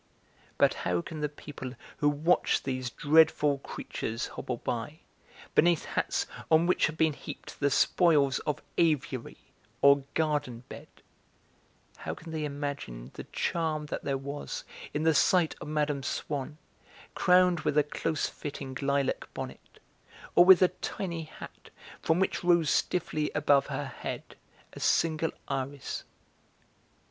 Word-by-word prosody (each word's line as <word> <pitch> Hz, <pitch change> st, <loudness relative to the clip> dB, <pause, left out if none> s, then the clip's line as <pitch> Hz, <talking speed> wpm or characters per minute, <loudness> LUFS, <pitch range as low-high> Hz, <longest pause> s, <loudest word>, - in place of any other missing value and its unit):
But -, -, +4 dB
how 90 Hz, -1 st, 0 dB
can 155 Hz, -, -7 dB
the 150 Hz, -1 st, -1 dB
people 140 Hz, -3 st, -8 dB, 0.2 s
who 145 Hz, -, +3 dB
watch 155 Hz, +5 st, +2 dB
these 130 Hz, -2 st, -2 dB
dreadful 150 Hz, 0 st, +4 dB
creatures 115 Hz, -3 st, -5 dB
hobble 125 Hz, -, -4 dB
by, 120 Hz, +8 st, -4 dB, 0.5 s
beneath 170 Hz, -1 st, +4 dB
hats -, -, -1 dB, 0.2 s
on 160 Hz, +1 st, +5 dB
which 180 Hz, -, +3 dB
have 155 Hz, 0 st, -6 dB
been 160 Hz, -1 st, +3 dB
heaped -, -, -9 dB
the 145 Hz, -, +3 dB
spoils 145 Hz, -2 st, +3 dB
of 150 Hz, -, -3 dB, 0.2 s
aviary 140 Hz, -7 st, 0 dB, 0.4 s
or 140 Hz, 0 st, +6 dB
garden 150 Hz, -7 st, 0 dB
bed, -, -, -9 dB, 1.1 s
how -, -, -5 dB
can 165 Hz, 0 st, -10 dB
they 155 Hz, -1 st, -2 dB
imagine 140 Hz, -, -5 dB
the -, -, -8 dB
charm 160 Hz, -3 st, -1 dB
that -, -, -4 dB
there 140 Hz, -1 st, 0 dB
was 140 Hz, +2 st, -5 dB, 0.3 s
in 150 Hz, -, -2 dB
the 160 Hz, 0 st, +4 dB
sight 170 Hz, +2 st, +3 dB
of -, -, -6 dB
Mme. 150 Hz, -2 st, 0 dB
Swann, 145 Hz, +2 st, -3 dB, 0.6 s
crowned 180 Hz, -1 st, +4 dB
with 150 Hz, -1 st, -1 dB
a 150 Hz, -, +6 dB
close 155 Hz, +1 st, -2 dB
fitting 135 Hz, -2 st, -7 dB
lilac 140 Hz, -1 st, 0 dB
bonnet, -, -, -8 dB, 0.5 s
or 175 Hz, -, +8 dB
with 185 Hz, 0 st, +8 dB
a 180 Hz, -, +5 dB
tiny 170 Hz, -2 st, -4 dB
hat -, -, -12 dB, 0.3 s
from 160 Hz, +2 st, +2 dB
which 190 Hz, -, 0 dB
rose 170 Hz, -3 st, +4 dB
stiffly 155 Hz, -4 st, 0 dB
above 145 Hz, -1 st, +4 dB
her -, -, -3 dB
head -, -, -6 dB, 0.4 s
a -, -, -9 dB
single 160 Hz, -1 st, +2 dB, 0.2 s
iris?" 135 Hz, 0 st, -4 dB
150 Hz, 140 wpm, -29 LUFS, 140-160 Hz, 1.1 s, or